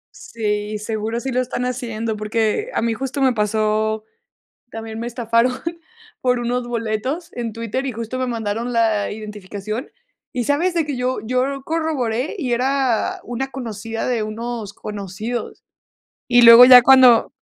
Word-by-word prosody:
Sí, 210 -2 -3
seguro 220 +2 -3
sí 265 +1 -4
lo 255 +1 +1
están 250 0 -3
haciendo, 230 -3 -3
porque 220 - -1
a - - 0
mí 230 -1 +1
justo 270 +4 -4
me 260 -2 +3
pasó 215 0 0 0.7
también 225 0 -7
me 235 - -3
estafaron 235 +1 +1 0.7
por 250 -1 +1
unos 240 0 -2
boletos 235 +8 -3
en 235 -2 -4
Twitter, 230 +4 -3
y - - -1
justo 230 +3 -5
me 255 - 0
mandaron 230 +1 -3
la 220 -3 +1
identificación, 210 +2 -6 0.4
¿y 245 -2 -2
sabes?, 335 +7 +1
de 325 -3 0
que 285 -3 -3
yo 250 +1 -1
yo 255 +2 +1
lo 275 -1 -5
corroboré 305 - -2
y 260 -8 -2
era 260 -1 0
una 245 +3 -4
conocida 225 -3 -5
de 240 -4 0
unos 220 -1 -5
conocidos. 210 +3 -6 0.6
Y 245 -1 +5
luego 230 +1 +11
ya 250 -1 +10
cuando 255 -3 +6
235 Hz, 155 wpm, -20 LUFS, 220-255 Hz, 0.7 s, luego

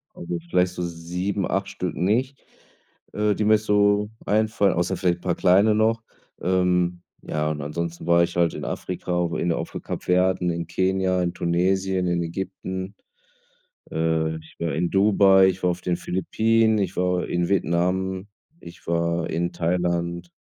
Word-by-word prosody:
Also, 180 -1 -4
vielleicht 90 - +2
so 90 - -5
7, 90 +3 -3
8 95 0 -1
Stück 90 -2 -4
nicht, 125 +9 0 0.7
äh, 105 -1 +1
die 105 - -1
mir 110 +1 +5
so 105 -1 +2 0.2
einfallen, 105 -2 +2
außer 90 +2 -1
vielleicht 90 -2 0
paar 90 -2 -1
kleine 100 +4 +4
noch. 110 +1 +2 0.4
Ähm, 90 -1 +1 0.2
ja, 75 0 -2
und 75 -1 -4
ansonsten 85 +3 -4
war 85 0 +5
ich 85 0 -3
halt 85 -1 +2
in - - -6
Afrika, 90 -1 -2
inne 85 -1 0
auf - - -6
'n - - -4
Kap - - -5
Verde, 90 +1 +2
in 85 -1 -4
Kenia, 95 +1 +1
in 85 -1 -1
Tunesien, 90 +2 0
in 85 -1 0
Ägypten, 95 +2 -5 1.0
äh, 80 0 0
ich 80 0 -15
war 85 -3 -2
in 85 +2 0
Dubai, 95 -1 +5
ich 95 0 -1
war 90 - +3
auf 90 +1 -6
den 90 -1 -1
Philippinen, 110 +5 +1
ich 95 -1 -2
war 90 0 0
in 85 0 -1
Vietnam, 95 +1 0 0.3
ich 85 0 -13
war 85 0 0
in 85 +2 -1
Thailand. 85 0 -1
90 Hz, 160 wpm, -24 LUFS, 85-95 Hz, 1.0 s, mir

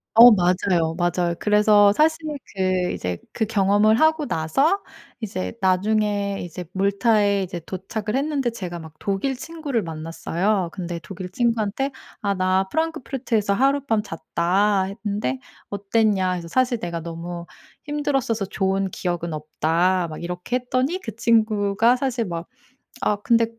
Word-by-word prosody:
어 235 +2 +11
맞아요, 180 -3 +2
맞아요. 175 0 0
그래서 210 -1 +5
사실 315 +4 +3 0.4
그 185 -2 0
이제 90 -1 -3
그 220 - -1
경험을 205 +1 +3
하고 315 0 +3
나서 275 - +1 0.4
이제 90 - -4
나중에 200 +1 +1
이제 175 +1 -7
몰타에 200 0 +2
이제 175 -2 -5
도착을 210 +5 -3
했는데 280 -3 0
제가 180 -7 -6
막 160 -1 -10
독일 205 +7 -1
친구를 290 - -3
만났어요. 170 +4 -1
근데 175 -3 -5
독일 185 +2 -7
친구한테 230 +3 0 0.3
"아 200 -1 +1
나 185 0 +1
프랑크푸르트에서 265 -9 -1
하룻밤 270 -2 +2
잤다." 190 +3 +1 0.2
했는데 200 -11 -1 0.3
"어땠냐?" 200 -2 +1
해서 170 -2 -5
"사실 250 0 +1
내가 170 -1 -4
너무 170 +1 -6 0.4
힘들었어서 275 -7 -1
좋은 195 -1 0
기억은 175 -2 -3
없다." 165 +4 0
막 155 - -7
이렇게 180 +8 -2
했더니 255 +8 -1
그 225 - -7
친구가 220 0 +3
사실 250 -3 -1
막 170 -2 -5 0.5
아 210 - +2
근데 230 +2 +3
200 Hz, 305 characters per minute, -23 LUFS, 180-230 Hz, 0.5 s, 어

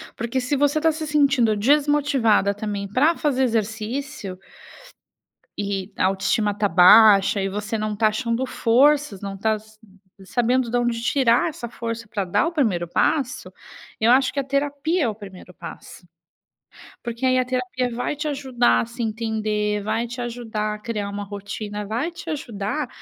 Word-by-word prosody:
porque 235 +3 -2
se 255 +3 -1
você 290 +2 +2
está 325 - +3
se 315 0 -3
sentindo 275 -7 +3
desmotivada 275 -5 +2
também 205 -1 -4
para 290 - +2
fazer 265 -3 +1
exercício 225 -1 -3 1.2
e 200 -1 -3
a - - +2
autoestima 195 +2 +1
está 205 0 0
baixa 195 +2 +6
e 195 - -1
você 210 +3 -3
não 215 0 -2
está 215 +1 +2
achando 230 +3 -1
forças, 260 -2 +2
não 195 -1 -5
tá 220 +2 +1
sa 215 0 -20 0.5
sabendo 245 +3 +1
de 245 - +1
onde 240 -1 0
tirar 240 +3 +2
essa 290 -6 -7
força 230 -1 -6
para 205 -2 -2
dar 185 - +1
o - - -2
primeiro 210 - 0
passo, 270 - 0 0.5
eu 225 +2 +4
acho 260 0 +4
que 285 - -3
a 275 - 0
terapia 285 +4 -1
é 235 - +1
o 210 - -5
primeiro 190 -3 -12
passo. 175 - -11 1.0
Porque 235 +2 -4
aí 255 0 +3
a 255 - +2
terapia 250 0 -2
vai 245 +5 -2
te 295 +1 -4
ajudar 260 -4 +1
a - - -3
se 235 +1 -8
entender, 215 -2 -1
vai 220 +3 -1
te 245 +1 -6
ajudar 225 -3 -3
a 210 - -11
criar 210 -2 -4
uma 205 0 -5
rotina, 205 +1 -6
vai 240 +11 -2
te 335 0 -9
ajudar 250 -2 -3
230 Hz, 170 wpm, -22 LUFS, 210-265 Hz, 1.2 s, baixa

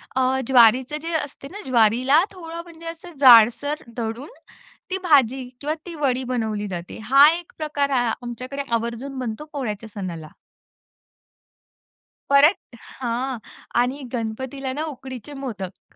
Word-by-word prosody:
अ, 260 0 +2
ज्वारीचं 255 +3 +5
जे 335 +1 -4
असते 275 -1 -10
ना 410 - -8
ज्वारीला 255 +5 +4
थोडं 335 -3 -8
म्हणजे 335 -1 -14
असं 335 +1 -8
जाडसर 255 +4 +6
दळून, 230 +3 -4 0.6
ती 375 - -1
भाजी 270 -6 +4 0.2
किंवा 295 +2 -1
ती 345 -2 -7
वडी 260 -4 0
बनवली 220 -5 -2
जाते 175 -2 -6
हा 275 +5 +7
एक 350 - -15
प्रकार 295 -2 -1
आहे 245 -4 +1
आमच्याकडे 255 +3 -5
आवर्जून 235 +4 -2
बनतो 245 +3 -4
पोळ्याच्या 225 -6 -4
सणाला. 170 -6 -6 2.0
परत 280 0 +4
हां 250 +1 -4 0.4
आणि 260 +4 -2
गणपतीला 260 +4 -4
ना, 300 +3 -3
उकडीचे 260 +1 -9
मोदक. 195 -7 -7
260 Hz, 130 wpm, -23 LUFS, 230-290 Hz, 2.0 s, हा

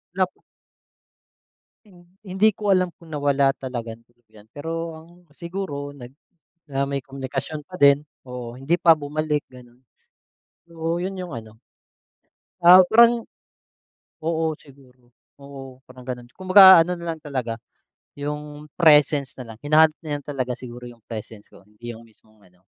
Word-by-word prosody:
Lap 185 -1 +1 1.6
Hin 185 -4 -19 0.2
hindi 190 +3 +2
ko 205 -2 0
alam 185 -1 +2
kung 165 -2 -16
nawala 140 -2 +2
talagang 120 -4 -7
tuluyan. 110 -3 -22
Pero 165 +2 -5
ang 160 +1 -14 0.3
siguro 170 -6 -6
nag 130 -4 -11 0.6
na 135 -1 -1
may 140 0 -3
komunikasyon 135 +3 -6
pa 180 +4 -11
din, 140 0 +6 0.3
oo, 125 -2 -7
hindi 135 +6 0
pa 170 -1 +6
bumalik, 150 0 -2
gano'n. 125 -1 -17 0.9
Oo, 165 +1 -3
yun 190 +1 -4
yung 180 -6 -7
ano, 110 -1 -10 1.1
ah, 180 +1 +10
parang 235 +1 +6 1.0
oo, 165 0 0
siguro. 130 -3 -21 0.3
Oo, 135 -2 -11
parang 130 0 -14
ganun. 125 -1 -7
Kumbaga 190 -1 +8
ano 180 +2 -3
na 170 -1 -4
lang 160 - -17
talaga, 130 -6 -4 0.6
yung 150 +1 -6
presence 150 -4 +4
na 115 -3 -9
lang. - - -17
Hinahanap 155 +1 +5
niya 155 -2 -5
lang - - -25
talaga 130 -3 -3
siguro 120 -1 -10
yung 120 -1 -17
presence 110 -2 -9
ko - - -18
hindi 105 +3 -10
yung 115 - -14
mismong 110 -1 -26
ano, 90 +1 -33
145 Hz, 145 wpm, -23 LUFS, 125-165 Hz, 1.6 s, ah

